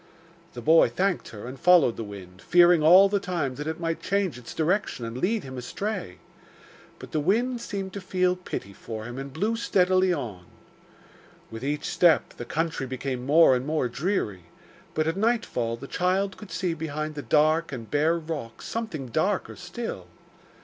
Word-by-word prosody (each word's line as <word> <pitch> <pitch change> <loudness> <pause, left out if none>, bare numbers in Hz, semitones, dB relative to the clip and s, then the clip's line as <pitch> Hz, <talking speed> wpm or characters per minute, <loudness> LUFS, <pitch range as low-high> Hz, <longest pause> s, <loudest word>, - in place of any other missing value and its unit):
The 120 - -8
boy 160 +2 +6
thanked 190 -1 -1
her, 105 0 -9
and 130 +2 -8
followed 175 -10 +5
the 115 - -5
wind, 95 -3 -10
fearing 175 -1 +5
all 180 +6 +8
the 200 0 0
time 170 -9 -2
that 150 +4 -6
it 160 +1 -3
might 165 -1 -2
change 195 -7 0
its 125 -1 -10
direction 165 - 0
and 115 0 -6
lead 200 - 0
him 130 -1 -7
astray. 190 - -4 0.8
But - - -11
the 155 - 0
wind 235 - +1
seemed 195 -3 -5
to 200 - -5
feel 185 -1 +1
pity 140 - -6
for 110 +1 -7
him 120 +2 -6
and 135 0 -6
blew 210 +10 -1
steadily 185 -4 +2
on. 110 - -4 1.1
With 115 +2 -7
each 145 +2 -2
step 170 -4 +3
the 120 - -6
country 160 -1 -2
became 130 0 -4
more 150 -2 +6
and 125 - -1
more 155 -4 0
dreary, 120 - -2 0.5
but 155 - +1
at 165 +3 -1
nightfall 200 - 0
the 135 - -9
child 185 +5 0
could 210 - -12
see 170 +1 -1
behind 155 -1 -4
the 145 - -5
dark 155 +3 +2
and 115 -5 -7
bare 155 +3 +2
rocks 155 -8 -6
something 220 - -4
darker 185 - 0
still. 180 - -6
160 Hz, 175 wpm, -26 LUFS, 130-185 Hz, 1.1 s, all